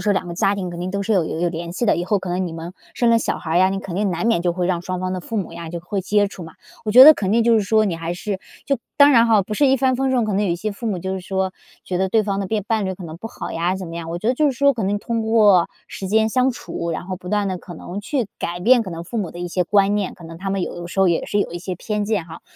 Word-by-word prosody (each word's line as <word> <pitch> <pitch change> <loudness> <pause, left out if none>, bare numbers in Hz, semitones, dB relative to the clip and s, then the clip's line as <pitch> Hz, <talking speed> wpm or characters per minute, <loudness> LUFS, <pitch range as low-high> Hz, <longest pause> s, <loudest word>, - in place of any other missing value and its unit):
说 210 - +2
两 190 - -1
个 170 - -6
家 195 +3 +2
庭 185 -3 -4
肯 175 - -7
定 180 +1 -3
都 200 +1 -2
是 220 - 0
有 180 -5 +3
有 160 - -4
有 175 - +2
联 170 +1 -5
系 235 +5 -2
的， - - +3
以 175 - -2
后 200 +2 +1
可 185 - -7
能 180 +1 -1
你 165 - -6
们 165 +2 -7 0.2
生 235 -1 +2
了 230 - +5
小 - - -2
孩 160 - -5
儿 175 - +4
呀， 185 +1 +5
你 195 - -2
肯 195 -3 -7
定 200 0 0
难 175 +5 -2
免 225 -7 +2
就 175 -1 +1
会 180 0 -1
让 175 -1 -1
双 185 0 -3
方 185 0 -2
的 185 - -3
父 225 - -5
母 190 -5 -3
呀 170 -1 -7
就 175 - -4
会 190 +4 -3
接 205 +2 +2
触 195 -2 -9
嘛。 160 -1 -11 0.3
我 215 - -1
觉 250 +5 +10
得 310 +2 +10
肯 190 -7 -2
定 225 +2 +3
就 235 - +5
是 220 - +4
说 215 +2 +3
你 185 -5 -1
还 165 +1 -4
是 190 +2 -4 0.3
就 275 - +2 0.2
当 285 0 +7
然 230 -1 +6
哈， 220 -3 +5
不 210 +3 -5
是 285 - +3
一 265 0 +4
帆 260 -1 +2
风 265 +1 0
顺， 245 -3 +2
可 215 - -2
能 205 +2 +1
有 185 - 0
一 170 - 0
些 210 +3 -3
父 230 +3 -7
母 195 -5 -1
就 190 +2 -3
是 190 - -4
说， 190 0 -2 0.3
觉 180 - -3
得 190 +1 +1
对 220 +2 +3
方 195 -1 -2
的 195 - -2
变 210 0 -1
伴 220 -2 0
侣 190 - -2
可 180 - -10
能 160 -1 -8
不 200 - -7
好 - - -7
呀 175 +3 0
怎 190 -2 -6
么 165 - -8
样。 165 -1 -6
我 170 - -3
觉 215 - -5
得 255 - +3
就 300 +3 +2
是 - - -3
说 280 +1 +3
可 225 - -3
能 205 +2 0
通 230 +1 -2
过 210 -5 +4 0.2
时 190 - -7
间 220 +1 +3
相 255 +3 +2
处， 170 -8 -5
然 165 +2 -4
后 185 - -4
不 180 0 -10
断 205 0 +1
地 185 - -2
可 175 - -10
能 175 +4 -7
去 245 +2 -2
改 175 +1 -3
变 240 +4 +5
可 190 - -7
能 165 -1 -6
父 235 - -6
母 200 -6 -2
的 175 - -10
一 175 0 -4
些 180 +1 0
观 200 +2 +3
念， 205 -2 -1
可 175 - -15
能 165 0 -9
他 195 +3 -4
们 195 -1 -1
有 175 - -4
的 175 - -6
时 195 - -2
候 190 - +5
也 170 - +1
是 205 - 0
有 - - -2
一 175 - -5
些 185 +1 -5
偏 210 +3 -2
见 205 -5 -1
哈。 165 -1 -11
195 Hz, 380 characters per minute, -21 LUFS, 175-220 Hz, 0.3 s, 觉